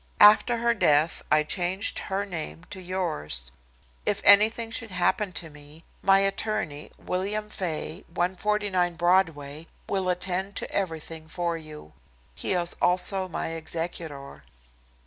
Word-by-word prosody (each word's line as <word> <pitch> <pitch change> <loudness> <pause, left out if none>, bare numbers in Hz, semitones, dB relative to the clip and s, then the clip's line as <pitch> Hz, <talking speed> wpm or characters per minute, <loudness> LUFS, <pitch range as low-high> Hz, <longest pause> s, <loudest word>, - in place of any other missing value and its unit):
After 215 +3 +7
her 235 0 +2
death 155 -6 +2
I 155 - +5
changed 180 +5 +1
her 195 +1 -1
name 165 -3 -5
to 190 - -5
yours. 75 - -3 0.5
If 205 -1 0
anything 220 +3 +5
should 225 0 0
happen 185 +2 0
to 165 -3 -2
me, 150 +2 -13 0.2
my 195 0 +5
attorney, 195 -7 -1
William 210 +3 -2
Faye, 165 -4 -3
149 185 0 0
Broadway, 165 -4 0 0.2
will 190 -2 -1
attend 185 +2 -2
to - - 0
everything 160 -4 -4
for 170 0 -2
you. 155 - -9 0.4
He - - +1
is 175 -1 0
also 185 +1 +4
my 170 - -4
executor. 160 -3 -5
180 Hz, 125 wpm, -26 LUFS, 160-195 Hz, 0.5 s, After